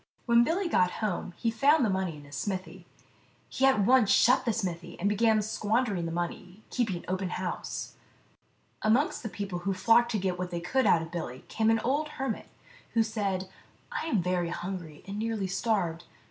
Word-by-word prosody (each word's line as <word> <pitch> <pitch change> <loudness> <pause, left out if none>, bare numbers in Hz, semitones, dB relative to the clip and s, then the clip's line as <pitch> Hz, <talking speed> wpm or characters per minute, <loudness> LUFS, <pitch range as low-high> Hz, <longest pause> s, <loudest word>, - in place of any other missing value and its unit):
55 - - -37
When 235 0 +6
Billy 350 +8 0
got 180 - +3
home 200 -4 -2
he 230 - 0
found 275 +4 +4
the - - +1
money 190 -4 -1
in 145 - -12
his 145 0 -10
smithy. 185 -1 -4 0.6
He 270 - +2
at 265 -6 +4
once 240 0 +5
shut 255 +4 +5
the 235 - +2
smithy, 180 -6 -4
and 195 - +1
began 215 +1 +3
squandering 210 -4 0
the - - -4
money, 180 +4 -5
keeping 210 -9 -1
open 185 0 -1
house. 180 0 -4 0.9
Amongst 240 +8 +2
the 225 - -4
people 195 -2 -4
who 190 +2 -1
flocked 230 +5 +4
to - - +2
get 185 -2 -1
what 180 0 -2
they 175 -1 -3
could 255 +10 +1
out 165 - +4
of 165 - -9
Billy 130 -8 -5
came 220 0 +1
an 225 0 +4
old 290 +6 0
hermit, 270 0 -3 0.5
who 225 - +5
said, 200 -4 -2 0.2
" - - -34
I - - -3
am 215 - +1
very 180 -1 0
hungry, 170 -4 -6
and 200 +2 -5
nearly 220 -3 -1
starved. 185 -4 -1
200 Hz, 195 wpm, -29 LUFS, 180-230 Hz, 0.9 s, When